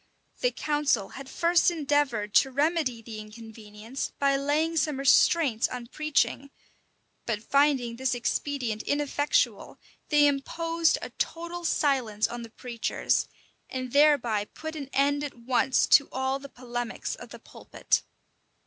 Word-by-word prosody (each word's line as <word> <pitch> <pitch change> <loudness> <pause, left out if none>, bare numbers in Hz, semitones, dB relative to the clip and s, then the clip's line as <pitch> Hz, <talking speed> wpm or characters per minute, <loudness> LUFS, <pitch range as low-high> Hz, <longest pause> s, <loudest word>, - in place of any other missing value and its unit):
The - - +2
council 295 - 0
had 270 0 -10
first 340 +1 +3
endeavored 290 - 0
to 270 - +5
remedy 280 -4 0
the 220 -1 -8
inconvenience 220 +2 -8
by 275 -1 +2
laying 295 +4 0
some 300 -3 0
restraints 275 -2 +4
on 250 -1 -6
preaching; 280 +1 -1 0.8
but 220 -2 -2
finding 275 -5 +2
this 260 -1 0
expedient 245 -2 -2
ineffectual, 290 +1 0 0.3
they 295 -1 +5
imposed 330 +4 +1
a - - -6
total 340 +1 -3
silence 255 -10 +1
on 240 0 -6
the 230 - -9
preachers, 235 0 -1 0.4
and 255 -1 -5
thereby 280 -8 +3
put 315 +8 -8
an 280 -3 -6
end 285 +1 +1
at 290 - -5
once 250 +2 +2
to 280 - +5
all 265 +1 -1
the 280 0 -10
polemics 245 -2 -5
of - - -10
the - - -10
pulpit. - - -2
275 Hz, 135 wpm, -27 LUFS, 235-295 Hz, 0.8 s, to